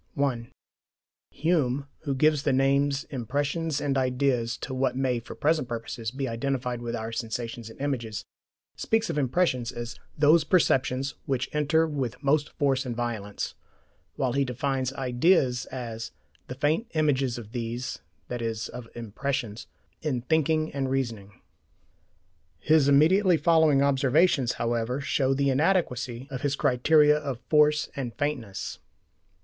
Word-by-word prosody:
(1) 130 -5 -1 0.8
Hume, 145 -5 0 0.2
who 140 -2 0
gives 150 +1 +3
the - - +1
names 140 +1 +2
"impressions" 145 +4 -1
and 140 -2 0
"ideas" 125 -2 0
to 135 - -6
what 130 -1 0
may, 130 -2 0
for 115 - -10
present 155 -3 +1
purposes, 115 -1 -4
be 135 +3 -3
identified 125 0 -2
with 120 0 -3
our 110 0 -4
"sensations" 115 0 -4
and 115 - -14
"images," 120 -6 -3 0.5
speaks 225 0 0
of - - -4
impressions 130 -3 +1
as 120 0 -7 0.2
"those 150 +2 +5
perceptions 135 -6 +2
which 130 -2 -1
enter 150 +2 +2
with 135 -6 -3
most 145 +1 +2
force 135 -2 +2
and 125 -3 -4
violence" 110 -4 -3 0.6
while 125 -2 0
he 140 +1 +2
defines 130 0 -1
ideas 130 0 +2
as 115 -3 -6 0.4
"the 125 - -6
faint 150 - 0
images 140 -5 +1
of 110 -3 -9
these 120 +1 -4 0.3
(i.e. 115 -2 -2 0.2
of 125 -1 -8
impressions) 120 0 -4 0.3
in 140 -6 -1
thinking 155 +1 +1
and 135 -1 -1
reasoning." 115 -7 -3 1.2
His 155 -3 +3
immediately 170 +6 +5
following 155 -3 +4
observations, 140 0 +3
however, 120 +2 -1
show 135 0 +1
the 140 0 +2
inadequacy 130 -6 0
of 130 - -4
his 145 -1 0
criteria 150 +3 +4
of 140 -5 -4
"force" 150 -1 +4
and 125 -4 -4
"faintness." 140 -10 -3
135 Hz, 135 wpm, -27 LUFS, 120-145 Hz, 1.2 s, those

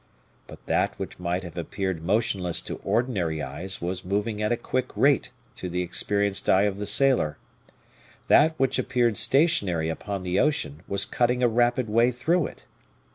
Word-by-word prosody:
But - - -13
that - - 0
which - - -7
might 90 +1 -2
have 85 -2 -9
appeared 95 0 -3
motionless 95 -3 0
to - - -6
ordinary 95 -11 0
eyes 85 +8 -4
was 90 +1 -3
moving 105 +3 -2
at 105 - 0
a 120 - +1
quick 130 +1 -2
rate 140 0 +3 0.2
to 95 -6 -6
the 90 +1 -1
experienced 100 +3 -1
eye 95 +1 +5
of 100 -1 -1
the 105 - -4
sailor; 110 - +2 0.9
that 160 +2 +5
which 135 0 +1
appeared 120 -4 +1
stationary 100 - +2
upon 95 +3 -4
the 90 0 0
ocean 150 - 0
was 100 0 -1
cutting 125 +1 0
a - - +6
rapid 120 +1 +1
way 115 +3 +3
through 155 +8 +1
it. - - -14
105 Hz, 170 wpm, -25 LUFS, 90-125 Hz, 0.9 s, a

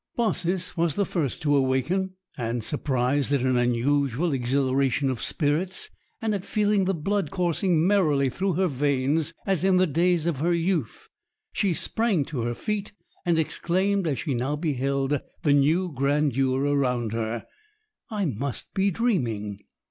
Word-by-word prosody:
Baucis 185 -6 -1
was 165 -3 +1
the 200 - +1
first 155 -8 -2
to 145 -1 +3
awaken; 140 +9 +1 0.2
and, 120 -2 -2
surprised 135 +1 0
at 140 - +2
an 130 0 +2
unusual 135 +5 +1
exhilaration 135 +1 +1
of 120 -3 -5
spirits, 165 +8 -1 0.3
and 225 -2 -1
at 195 -3 -2
feeling 210 -2 +1
the 190 0 +1
blood 195 +5 -1
coursing 175 -2 +1
merrily 155 -9 +3
through 190 +8 -1
her 190 +4 +2
veins 145 +2 0
as 190 -4 0
in 190 -1 +4
the 185 - +5
days 170 +1 +1
of 170 -5 0
her 170 +5 +1
youth, 170 - -1 0.4
she 200 - +1
sprang 195 -2 0
to 135 -4 -4
her 120 +1 -2
feet 210 - -3 0.3
and 170 -2 +3
exclaimed 185 +4 0
as 140 -4 0
she 140 - -2
now 130 +4 -1
beheld 140 -2 0 0.2
the 145 - +4
new 160 +5 +2
grandeur 135 -1 +1
around 125 -5 +1
her, 115 0 -3 0.6
"I 210 -3 -1
must 135 -1 -4
be 195 0 +2
dreaming!" 120 - -1
150 Hz, 155 wpm, -25 LUFS, 130-185 Hz, 0.6 s, the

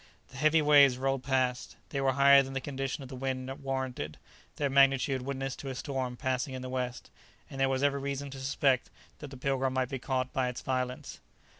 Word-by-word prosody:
The 135 - -12
heavy 155 +2 +4
waves 140 -3 +6
rolled 135 0 0
past; 130 -2 -1
they 140 -4 -2
were 135 -1 +2
higher 140 +1 +7
than 135 0 -6
the 135 - -1
condition 135 0 -4
of 130 - -10
the 130 - -7
wind 130 0 -3
warranted; 130 - -3 0.4
their 145 - 0
magnitude 135 0 +3
witnessed 135 0 -4
to 135 - -6
a 130 - -5
storm 130 -2 -3
passing 130 0 -2
in 130 - -6
the 130 - -5
west, 125 -1 -4 0.4
and 135 - -7
there 135 - +3
was 135 +1 0
every 140 -1 +2
reason 140 0 -4
to 135 - -8
suspect 135 -1 +1 0.3
that 145 - -8
the 135 - -10
"Pilgrim" 135 0 0
might 130 -1 0
be 135 - -4
caught 130 -1 -2
by 130 -1 +1
its 125 - -6
violence. 130 -1 -3
135 Hz, 210 wpm, -30 LUFS, 130-140 Hz, 0.4 s, higher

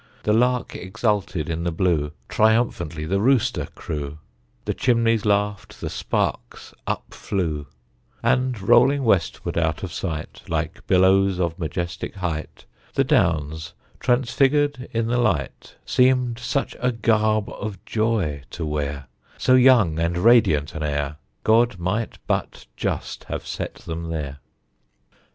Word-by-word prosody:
The 105 - +2
lark 125 +2 +1
exulted 95 -4 -1
in 85 0 -2
the 85 - 0
blue, 80 -4 +1 0.2
Triumphantly 105 -8 +1
the 95 +5 0
rooster 125 +1 +2
crew, 75 -1 -5 0.5
The - - 0
chimneys 115 -3 +2
laughed, 105 0 0
the - - -4
sparks - - -3
up - - -3
flew; 80 -7 -2 0.6
And 125 -2 +1
rolling 135 +7 +4
westward 95 -6 +1
out 80 0 -1
of 90 - -5
sight, 80 -5 -5
Like - - -3
billows 95 0 +4
of 85 -1 -1
majestic 85 +2 -4
height, 85 -5 -4 0.3
The 135 - +4
Downs, 80 - +1 0.3
transfigured 135 +2 +2
in 115 0 0
the 120 +2 +1
light, 90 - -1
Seemed 125 -2 +2
such 135 +3 -2
a 125 - +1
garb 110 -2 +2
of 105 -1 -6
joy 110 -10 0
to 80 - -5
wear, 75 -2 -3 0.3
So 130 - +3
young 125 -11 +5
and 85 +1 0
radiant 90 -9 +4
an 80 - -5
air, 75 -1 -2 0.3
God 115 -1 +3
might 95 +6 -2
but - - -2
just - - -3
have - - -5
set - - -5
them 85 0 -6
there. 70 -4 -4
95 Hz, 135 wpm, -23 LUFS, 80-120 Hz, 0.6 s, young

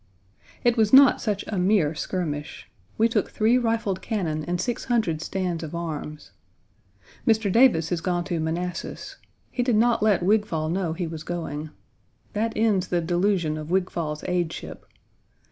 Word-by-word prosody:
It 240 0 +3
was 215 -2 +3
not 270 0 +7
such 210 -3 -2
a 200 - -3
mere 180 -5 +3
skirmish. 155 -3 -4 0.3
We 225 - +4
took 220 -4 0
three 230 +4 +2
rifled 225 -5 -1
cannon 165 -9 -2
and 175 0 -2
six 240 +6 -2
hundred 215 -11 0
stands 180 -2 -2
of 160 +1 -6
arms. 155 -2 -6 1.0
Mr. 220 -3 +3
Davis 225 -9 +4
has 175 -2 -1
gone 175 0 -1
to 175 -2 -3
Manassas. 170 +3 -4 0.3
He 250 - -1
did 245 -2 +2
not 235 +1 +3
let 205 -5 +3
Wigfall 190 -6 +1
know 175 -3 -1
he 175 +1 -3
was 160 -1 -6
going. 155 -3 -5 0.6
That 220 +2 -1
ends 210 -4 +2
the 175 - 0
delusion 175 -2 0
of 155 0 -7
Wigfall's 170 -4 -1
aideship. 175 -3 -3
180 Hz, 155 wpm, -25 LUFS, 165-215 Hz, 1.0 s, not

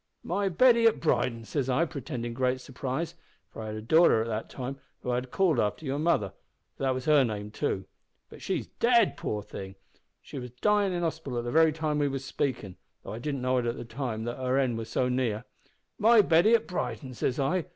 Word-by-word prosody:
"`My 195 +3 0
Betty 235 +4 +5
at 225 - +2
Brighton!' 115 -7 0
says 135 +1 -2
I 145 +6 +3
pretendin' 125 -6 -5
great 130 +1 0
surprise, 135 +5 -4 0.4
for - - -8
I 110 - -5
had 110 - -4
a 110 - -6
darter 155 -3 +5
at - - -6
that 110 0 -3
time 135 +1 -6 0.2
whom 125 - -1
I - - +1
had 125 +1 -3
called 170 -4 +2
after 105 +9 -1
your 140 +1 -2
mother, 150 - +1 0.4
for - - -14
that 130 -1 +1
was 130 - -5
her 150 -3 +5
name 105 -3 -3
too 95 -2 -2 0.4
but - - -13
she's - - -2
dead, 235 -3 +3
poor 105 -1 -3
thing! 95 -1 -8 0.4
she 140 - -8
was 125 -1 -7
dyin' 205 -2 +3
in 175 -1 -2
hospital 160 -6 -3
at 120 - -2
the 120 - -2
very 160 +2 +5
time 155 -1 -1
we 145 - +2
was 135 -1 -4
speakin', 125 -9 -3 0.3
though - - -7
I 110 - -6
didn't 140 0 -3
know 130 0 +2
at 120 -1 -2
the - - -6
time 115 -2 -4
that 120 +1 -4
her 130 0 0
end 125 -4 +1
was 110 0 -6
so 125 - +1
near 125 -3 -1 0.6
`my 220 -1 +6
Betty 175 +8 +6
at 230 - 0
Brighton!' 140 -6 -4
says 125 +2 -1
I. 165 +5 +1
130 Hz, 225 wpm, -28 LUFS, 120-160 Hz, 0.6 s, `my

